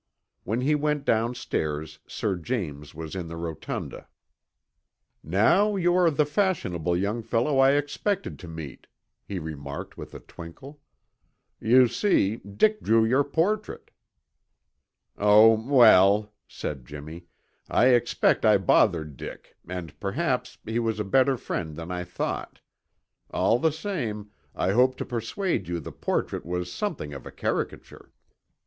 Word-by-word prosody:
When 110 +5 -1
he 145 +4 +2
went 150 -1 0
downstairs 80 -10 -1
Sir 100 -3 -2
James 80 - -4
was 80 +2 -7
in 90 -3 -4
the 85 0 -7
rotunda. 85 -2 -6 1.2
"Now 145 - +3
you 175 -2 +2
are 180 -2 +4
the 150 -1 +2
fashionable 145 - 0
young 105 +5 -1
fellow 120 +5 0
I 135 +1 +6
expected 145 +8 -2
to 90 - -10
meet," 80 -4 -9 0.4
he 100 - -4
remarked 70 -4 -7
with - - -9
a - - -7
twinkle. 130 - -12 0.8
"You 125 +3 +5
see, 115 - +1
Dick 210 - +1
drew 110 0 +3
your 130 +5 +3
portrait." 185 +9 -2 1.3
"Oh, 105 +2 +7 0.2
well," 105 -5 +6
said 70 -4 -6
Jimmy, 80 +5 -9 0.4
"I 125 - +4
expect 120 -1 +2
I 110 -2 +6
bothered 85 -6 +2
Dick - - -10
and 90 -4 -7
perhaps 130 +6 -2
he 110 +2 -1
was 115 -2 -1
a - - 0
better 130 +6 +3
friend 80 -8 -4
than 85 +2 -7
I 90 0 -3
thought. 90 - -4 0.7
All 120 - +2
the 160 +4 +2
same, 120 - -4 0.2
I 95 - 0
hope 130 +4 +3
to - - -4
persuade 125 - -2
you 85 0 -2
the 80 - -8
portrait - - -2
was 90 +1 -4
something 155 - -4
of 70 - -9
a - - -9
caricature." - - -4
110 Hz, 140 wpm, -26 LUFS, 85-140 Hz, 1.3 s, Oh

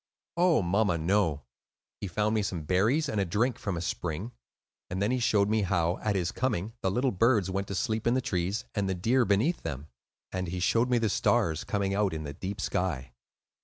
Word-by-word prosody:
"Oh, 170 - +3
mamma, 95 0 +2
no. 80 -3 +1 0.6
He 100 - -4
found 105 +4 0
me 110 - +2
some 90 -5 -3
berries 110 - +2
and 110 -7 0
a - - +3
drink 110 +7 0
from 100 -5 -3
a - - -3
spring; 90 +5 -3 0.6
and 90 - -3
then 100 +4 +1
he 130 - +1
showed 105 -4 +3
me 110 +1 +2
how, 85 -2 0
at 105 -2 -1
his 90 -3 0
coming, 110 -4 -2
the 95 - +1
little 125 +7 +1
birds 105 -2 +2
went 100 +1 -2
to 100 - -4
sleep 110 +1 -1
in 120 - +3
the - - +3
trees, 95 0 -2
and 100 -2 -1
the 95 - 0
deer 120 +8 +2
beneath 110 - +1
them. 75 -2 -6 0.4
And 95 -1 -3
he 90 +2 -3
showed 115 +7 +2
me 125 - +3
the 115 -1 +1
stars, 80 -5 +1
coming 100 -1 -1
out 100 -4 +1
in 80 - -4
the 70 -1 -6
deep 95 +6 -5
sky. 75 -11 -2
100 Hz, 215 wpm, -29 LUFS, 90-110 Hz, 0.6 s, Oh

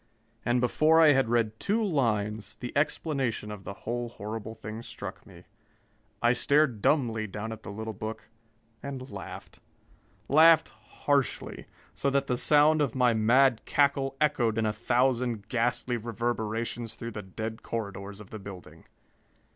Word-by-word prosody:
And 120 +1 +2
before 155 +6 +4
I 160 -2 +8
had 135 -4 +2
read 110 -2 +1
two 220 +3 +1
lines, 110 - -1
the 125 - -7
explanation 140 -7 -1
of 105 -2 -9
the 100 - -5
whole 120 +1 -2
horrible 110 0 -6
thing 110 +1 -7
struck - - -8
me. - - -14 0.8
I 120 +1 +5
stared 140 -3 +2
dumbly 115 -7 +1
down 105 +2 -5
at 110 -1 -7
the - - -9
little 110 +2 -5
book 110 +1 -6 0.5
and 135 -2 -7
laughed. 95 -2 -9 0.7
Laughed 160 +2 +6 0.3
harshly, 140 -3 0 0.3
so 140 - 0
that 140 0 +1
the 125 - 0
sound 150 +4 +4
of 135 -4 0
my 125 -2 +4
mad 120 +3 +4
cackle 140 -2 +1
echoed 125 -7 +2
in 110 - +1
a 105 - 0
thousand 120 -1 0
ghastly 120 +1 0
reverberations 115 0 -3
through 115 0 -6
the 105 - -6
dead 110 +4 -6
corridors 100 -3 -5
of 105 - -13
the 110 - -6
building. 90 -5 -11
120 Hz, 150 wpm, -28 LUFS, 110-135 Hz, 0.8 s, I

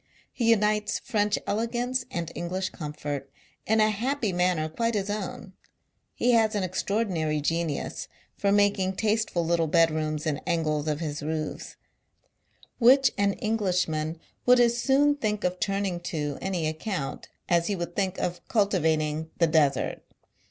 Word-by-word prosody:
He 235 - -1
j 230 - +7
unites 210 0 +1
French 210 -1 0
elegance 240 +3 -1
and 170 -3 -4
English 185 +2 -3
comfort, 145 -3 -5 0.4
i - - +4
in 220 - +4
a 215 0 +4
happy 230 0 -1
manner 175 -3 +1
quite 230 +8 -1
his 200 0 -1
own. 195 -2 -5 0.6
He 245 - +1
lias 225 -2 +3
an 205 - 0
j - - +1
extraordinary 185 -5 -1
genius 165 0 -2 0.3
for 200 - +1
making 200 -2 +2
tasteful 215 -5 0
little 165 -1 +1
j - - -9
bedrooms 155 -2 +2
iu 150 -2 -1
angles 155 -3 0
of 150 +1 -1
his 150 -2 -3
roofs, 155 0 -4 1.0
which 260 +2 +6
an 200 0 +2
Englishman 180 -8 -1 0.3
would 250 0 +7
as 235 -1 +4
soon 285 +3 +3
think 210 -5 -1
of 180 0 -1
turning 195 -2 -1
• - - -25
to 150 -5 -3
any 185 -4 -1
account, 155 -1 -4 0.2
as 170 -1 +2
he 205 - 0
would 175 -1 -5
think 195 -1 -1
of 175 0 -2
cultivat 185 -8 +2
i - - 0
ing 155 +1 -3
the 170 - +4
Desert. 150 -4 +1
185 Hz, 165 wpm, -27 LUFS, 160-215 Hz, 1.0 s, j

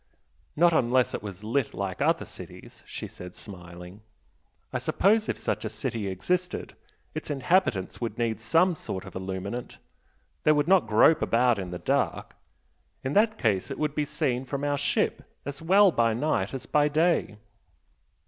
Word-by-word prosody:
"Not 170 +1 +5
unless 125 -2 +2
it - - -3
was 100 -1 -8
lit 120 +4 -1
like 95 -1 -4
other - - +2
cities!" - - -11
she - - -6
said, 90 0 -11
smiling 90 0 -11 0.7
"I - - 0
suppose 215 +3 +2
if - - -1
such - - -2
a - - -2
city 110 -4 -3
existed, 180 - -2 0.4
its 155 - -6
inhabitants 145 - +1
would 115 -2 -3
need 115 -2 -1
some 165 +9 +3
sort 95 -10 -6
of - - -10
illuminant 95 +5 -5 0.6
they 155 - +5
would 145 0 +1
not 185 -7 +4
grope 110 +9 +5
about 120 -1 +3
in 95 -2 -5
the 90 - -5
dark. - - -1 0.7
In 130 - -2
that 215 +1 +3
case 105 - 0
it - - -5
would 150 -2 -1
be 150 0 0
seen 145 -4 -1
from 140 +2 -4
our 145 -1 0
ship 145 - 0 0.2
as 140 +1 -6
well 195 +4 +5
by 115 -5 +2
night 120 -6 0
as 130 - -6
by 150 0 +3
day." 155 -7 +1
130 Hz, 165 wpm, -27 LUFS, 105-155 Hz, 0.7 s, Not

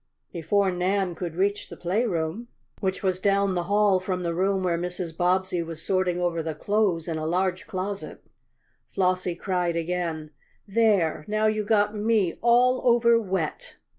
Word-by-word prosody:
Before 190 +4 +1
Nan 185 +1 0
could 170 -1 -5
reach 200 +3 -1
the - - -10
playroom, 185 +1 -1 0.3
which 190 -1 -2
was 185 -1 0
down 200 0 +2
the 175 -1 -2
hall 205 -2 +4
from 185 -1 -3
the 170 -1 -1
room 190 +2 0
where 175 -2 +1
Mrs. 175 -1 -4
Bobbsey 180 0 +1
was 165 -1 -6
sorting 185 0 0
over 175 -2 0
the 160 -1 -4
clothes 195 -2 0
in 160 -2 -2
a 155 - -3
large 185 +2 -1
closet, 200 -1 -5 0.7
Flossie 185 -2 0
cried 180 -2 -1
again: 165 -2 -3 0.4
"There! 200 -7 +2
Now 215 +1 0
you 215 0 +1
got 210 -1 +2
me 210 -4 +1
all 250 +2 +4
over 235 -1 +4
wet!" 185 -6 -3
185 Hz, 160 wpm, -25 LUFS, 175-205 Hz, 0.7 s, hall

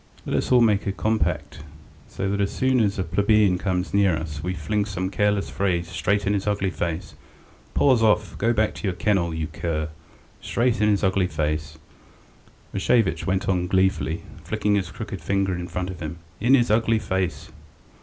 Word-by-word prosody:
Let - - -2
us - - -1
all 125 -1 +6
make 105 -3 +3
a - - +1
compact, 80 -8 -1 0.6
that 100 +1 0
as 100 - +1
soon 130 -1 +2
as 100 -3 +1
a 95 - 0
plebeian 100 +1 +3
comes 90 -2 -2
near 100 -5 +3
us 75 -2 -5
we 90 +3 -3
fling 100 +7 -1
some 95 -2 -3
careless 105 -1 +1
phrase 90 -3 0
straight 100 +2 0
in 100 - +2
his 100 0 -2
ugly 100 -2 0
face: 85 +1 -4 0.6
'Paws 130 -5 +4
off! 105 -4 +2
Go 115 +3 +2
back 110 -2 +1
to 105 - -5
your 90 - -1
kennel, 95 -5 +1
you 80 -1 -2
cur!' 80 -2 -3 0.5
straight 120 -3 0
in 105 - +4
his 100 -1 +1
ugly 95 -1 +2
face," 75 -1 -2 1.0
Rashevitch 115 -6 +1
went 95 0 0
on 90 -2 +1
gleefully, 95 -3 +1 0.2
flicking 105 - 0
his 95 -4 0
crooked - - -7
finger 95 -1 0
in 90 0 -4
front 90 +1 -3
of 90 - -9
him. 80 0 -5 0.2
"In 120 +6 +5
his 120 -4 +2
ugly 115 +1 +3
face!" 95 -4 -2
95 Hz, 185 wpm, -24 LUFS, 85-105 Hz, 1.0 s, all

